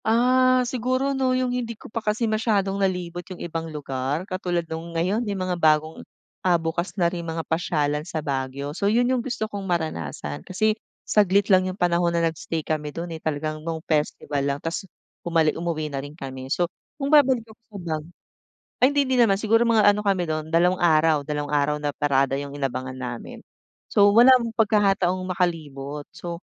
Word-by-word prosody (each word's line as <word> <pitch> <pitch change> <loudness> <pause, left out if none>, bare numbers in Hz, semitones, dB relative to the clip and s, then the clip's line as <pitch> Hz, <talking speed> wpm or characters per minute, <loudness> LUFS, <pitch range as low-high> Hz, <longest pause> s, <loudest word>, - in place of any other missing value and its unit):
Ah, 255 +2 +4
siguro 255 +3 0
'no 260 -1 +1
yung 255 -1 0
hindi 235 -3 -3
ko - - -17
pa 230 +1 -4
kasi 215 +2 0
masyadong 210 -3 0
nalibot 180 -2 -1
yung 185 - -7
ibang 165 -1 -5
lugar 145 +1 -3
katulad 180 -3 -2
nung 165 +1 -6
ngayon 190 +7 +1
yung 200 - -2
mga 180 -2 -2
bagong, 155 0 +2 0.4
ah, 180 -2 +3
bukas 170 +3 -3
na 175 - +2
rin 170 0 -1
mga 165 -1 -4
pasyalan 150 -3 0
sa 160 +1 -6
Baguio. 140 +1 -3
So, 200 +5 0
'yon 235 +3 +3
yung 250 - +1
gusto 235 -3 -3
kong 205 -2 -6
maranasan 85 - -3
kasi 215 +3 +1 0.3
saglit 200 -1 +3
lang 185 0 +4
yung 185 - -6
panahon 170 -2 +2
na 170 - +2
nag-stay 160 0 -3
kami 155 -1 -2
do'n, 165 +3 -6
eh, 160 - -7
talagang 155 0 -3
nung 165 +1 -3
festival 150 -2 -1
lang 140 0 0
tapos 165 +5 -5 0.3
bumalik 165 -2 +2
umuwi 160 -3 -3
na 135 - -2
rin 145 +2 -10
kami. 130 -3 -7
So, 175 +5 +1 0.3
kung 280 0 -2
babalik 260 -6 +5
ako 220 0 -18
sa 205 - -9 0.2
Baguio 155 - -15 0.7
ay 260 - +6
hindi 285 -1 +2
din 255 -2 +4
naman 195 -4 +2
siguro 225 +2 +3
mga 225 -3 +4
ano 205 0 +4
kami 190 -4 +1
do'n 155 0 -3
dalawang 175 +2 +3
araw, 155 -2 +4
dalawang 145 0 -3
araw 145 +1 +2
na 145 -1 -3
parada 135 -2 +2
yung 140 0 -4
inabangan 130 -2 -3
namin. 125 -2 -6 0.5
So, 205 0 +5
wala 240 +5 +8 0.2
pagkakataong 195 -4 +2
makalibot, 150 -6 -2
so 175 0 -7
175 Hz, 185 wpm, -24 LUFS, 150-210 Hz, 0.7 s, wala